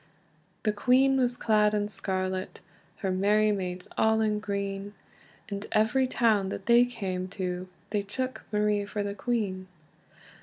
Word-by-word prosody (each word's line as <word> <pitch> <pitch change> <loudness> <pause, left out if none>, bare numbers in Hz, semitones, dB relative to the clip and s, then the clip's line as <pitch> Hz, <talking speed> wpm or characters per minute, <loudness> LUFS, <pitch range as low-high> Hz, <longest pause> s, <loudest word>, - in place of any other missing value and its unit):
The 215 - +1
queen 260 +5 +4
was 250 -1 +1
clad 210 -1 +3
in 205 0 0
scarlet, 185 -2 -3 0.4
Her 190 - 0
merry 210 +3 +3
maids 185 -2 -3
all 220 0 +4
in 215 -1 +1
green; 200 -1 -4 0.5
And 200 0 -5
every 225 +5 +3
town 220 -6 +2
that 195 - -6
they 240 +1 +6
cam 190 -7 -4
to, 180 -1 -3 0.2
They 205 -1 +1
took 255 +6 -4
Marie 210 -1 +1
for 205 0 -3
the 200 0 -3
queen. 200 -4 -2
210 Hz, 145 wpm, -28 LUFS, 195-220 Hz, 0.5 s, they